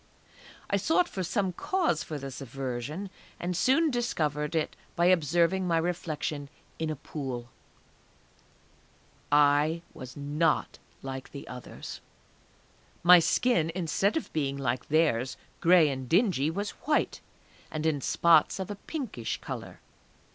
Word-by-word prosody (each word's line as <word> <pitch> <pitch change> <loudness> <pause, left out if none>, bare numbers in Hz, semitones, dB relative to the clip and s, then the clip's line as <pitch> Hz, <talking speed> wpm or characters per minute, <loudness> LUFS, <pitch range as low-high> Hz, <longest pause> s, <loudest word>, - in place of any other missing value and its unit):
I 200 - +1
sought 320 - +2
for 190 - -5
some 190 0 0
cause 340 - 0
for 155 - -5
this 135 -1 -7
aversion, 135 +8 -5 0.3
and 180 +1 -2
soon 275 - +3
discovered 155 - -1
it 160 - 0 0.2
by 170 - +2
observing 175 +2 +3
my 165 -1 +2
reflection 155 -4 -2 0.3
in 160 -1 -1
a 155 - -2
pool. 130 -4 -6 1.8
I 150 +3 +4
was 130 +1 -9
not 150 +3 0 0.2
like 135 -1 -6
the 140 - -9
others! 125 -1 -8 1.0
My 180 +1 +9
skin 170 -2 +2
instead 190 - +1
of 320 - -5
being 140 -3 -1
like 125 -2 -2
theirs, 140 -5 +2 0.2
gray 170 -2 +6
and 130 -3 -4
dingy, 175 - +3
was 200 +5 -3 0.2
white, 300 - +1 0.5
and 155 0 -4
in 150 -3 +1
spots 165 +4 +4
of 190 +1 -4
a 205 - -6
pinkish 235 - -4
colour.... - - -7
160 Hz, 130 wpm, -29 LUFS, 140-185 Hz, 1.8 s, My